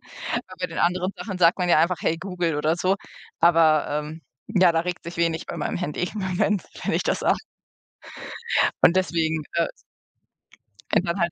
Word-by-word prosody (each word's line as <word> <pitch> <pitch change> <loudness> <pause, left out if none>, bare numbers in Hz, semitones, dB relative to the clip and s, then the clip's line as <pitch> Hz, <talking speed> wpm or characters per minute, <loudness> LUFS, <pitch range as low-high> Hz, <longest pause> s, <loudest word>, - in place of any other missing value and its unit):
Weil 210 -6 -6
bei 180 - 0
den 165 - -7
anderen 180 +2 +1
Sachen 195 -4 -5
sagt 170 +1 +4
man 180 - 0
ja 170 - +5
einfach: 170 +2 +2
„Hey 165 - +1
Google“ 175 -3 -2
oder 155 +3 +1
so. 185 +3 +1 0.4
Aber, 165 -2 +5
ähm, 150 +2 -4 0.3
ja, 185 -5 +4
da 165 - +2
regt 180 +1 -4
sich 170 +1 -7
wenig 165 -1 0
bei - - -6
meinem 150 - -2
Handy 175 -4 -3
im 215 - -5
Moment, 190 +1 0 0.2
wenn - - 0
ich - - +1
das - - 0
sage. - - +2 1.4
Und 170 - +6
deswegen, 160 -4 0
äh 170 - +2 1.3
wenn - - +4
dann 170 +2 -2
halt 170 0 +1
170 Hz, 185 wpm, -24 LUFS, 165-185 Hz, 1.4 s, Und